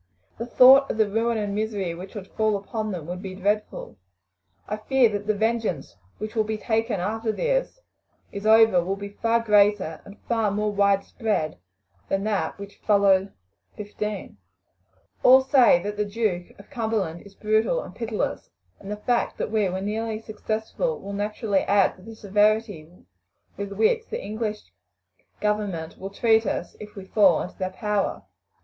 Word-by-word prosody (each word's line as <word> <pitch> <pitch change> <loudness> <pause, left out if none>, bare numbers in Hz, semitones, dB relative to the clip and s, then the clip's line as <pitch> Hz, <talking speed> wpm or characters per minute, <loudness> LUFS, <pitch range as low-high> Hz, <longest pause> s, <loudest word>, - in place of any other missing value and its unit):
The 230 - -4
thought 265 +3 +7
of - - -2
the 220 -1 +3
ruin 225 +3 0
and 205 -2 -2
misery 205 -4 -2
which 185 +5 -10
would 200 -3 -6
fall 215 -1 +1
upon 215 +2 -4
them 175 -5 -5
would 180 +2 -6
be 190 -2 -7
dreadful. 200 - -2 0.7
I 210 - -3
fear 250 +2 +3
that 205 0 -4
the 215 - +2
vengeance 220 - -1 0.2
which 215 +1 -6
will 220 -2 +2
be 215 0 -3
taken 225 -1 -1
after 220 +4 -1
this - - -1 0.5
is 200 +1 -4
over 220 -5 +6
will 190 +3 -2
be 200 0 -7
far 230 +3 0
greater 205 -6 +3
and 200 - -13 0.4
more 210 0 0
widespread 200 - 0 0.5
than 195 0 0
that 210 -2 -1
which 200 0 -10
followed 200 -2 +3 0.5
'15. 210 - -5 0.8
All 260 +1 +7
say 255 -10 +5
that 205 +1 -4
the 210 - 0
Duke 205 -4 -2
of 200 - -16
Cumberland 215 -8 -2
is 200 -1 -16
brutal 220 - +1
and - - -11
pitiless, 225 -3 -3 0.3
and 195 - -10
the 210 - -3
fact 240 +3 -1
that - - -3
we 215 -3 +1
were 185 +1 -3
nearly 215 +2 -3
successful 220 - -3
will 200 - -7
naturally 205 0 -1
add 200 -1 +2
to - - -17
the 225 +4 -11
severity 210 -4 +1 0.7
with 200 0 -5
which 225 - +1
the 470 - -4
English 215 - -4 0.8
government 205 -6 -2
will 195 - -6
treat 220 +1 +2
us 175 - -3
if 210 0 -10
we 195 -2 -8
fall 190 -4 +4
into 180 - -10
their 185 -1 -1
power. 205 +1 -2
210 Hz, 165 wpm, -24 LUFS, 195-220 Hz, 0.8 s, thought